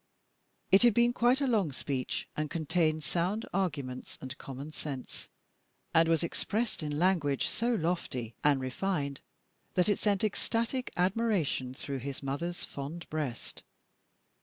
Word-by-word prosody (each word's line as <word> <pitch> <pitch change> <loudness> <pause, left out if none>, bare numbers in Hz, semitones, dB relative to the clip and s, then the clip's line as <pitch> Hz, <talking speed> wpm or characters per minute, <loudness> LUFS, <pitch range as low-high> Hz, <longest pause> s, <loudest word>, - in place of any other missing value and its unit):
It 195 - +8
had 240 -3 +6
been 240 0 +5
quite 245 +3 +4
a - - +3
long 210 - +2
speech, 130 -1 -2
and 150 0 -1
contained 155 -1 +1
sound 180 +8 0
arguments 145 -9 -2
and 130 0 -6
common 140 +3 -7
sense, 140 -4 -6 0.6
and 165 0 +5
was 165 0 +3
expressed 215 +6 -1
in 150 -1 -2
language 160 -6 +2
so 235 +1 +1
lofty 160 - -1
and 145 -2 +5
refined 140 +1 -2 0.5
that 180 +2 +4
it 205 - +2
sent 205 -2 +2
ecstatic 230 +4 0
admiration 180 - +1
through 135 0 -4
his 140 +2 -5
mother's 165 +6 -2
fond 145 +5 -6
breast. 145 -7 -3
165 Hz, 135 wpm, -31 LUFS, 140-200 Hz, 0.6 s, It